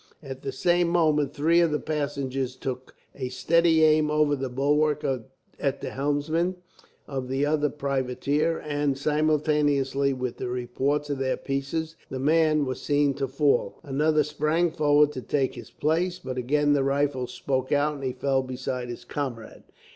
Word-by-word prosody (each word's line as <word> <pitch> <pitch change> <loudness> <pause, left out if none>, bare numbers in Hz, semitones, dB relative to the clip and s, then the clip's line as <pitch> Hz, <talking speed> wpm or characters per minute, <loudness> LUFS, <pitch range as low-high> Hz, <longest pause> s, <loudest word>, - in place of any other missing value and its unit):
At 135 -1 -7
the 135 - -4
same 175 +6 +2
moment, 155 -4 +2
three 160 +3 +3
of 170 -1 +4
the 150 -1 -1
passengers 140 -4 -2
took 130 0 -6 0.2
a 130 -2 -4
steady 165 +5 +3
aim 155 -1 +4
over 150 -1 +2
the 135 -1 -4
bulwark 150 +3 +1 0.5
at 140 -1 -1
the - - -5
helmsman 150 +6 0 0.5
of 135 -2 -4
the 135 +2 0
other 150 0 +1
privateer 140 +3 -1
and, 145 -2 -1
simultaneously 145 -2 +1
with 125 -2 -3
the - - -4
reports 135 +4 -1
of 140 - -2
their 130 -1 0
pieces, 155 +4 -3
the 130 - -4
man 155 +1 +3
was 130 -1 -4
seen 145 -1 +2
to 135 0 -2
fall. 140 +2 +1
Another 150 +2 +2
sprang 155 +3 0
forward 150 -2 +3
to 130 - -6
take 135 0 0
his - - -10
place, 175 +4 0
but 130 -8 -6
again 145 +4 +2
the 140 -2 +2
rifles 135 -2 0
spoke 130 0 -2
out, 145 +1 +2
and 140 -2 -8
he 130 - -1
fell 135 +1 0
beside 125 -1 -4
his 120 0 -7
comrade. 120 -5 -5
145 Hz, 165 wpm, -26 LUFS, 135-150 Hz, 0.5 s, of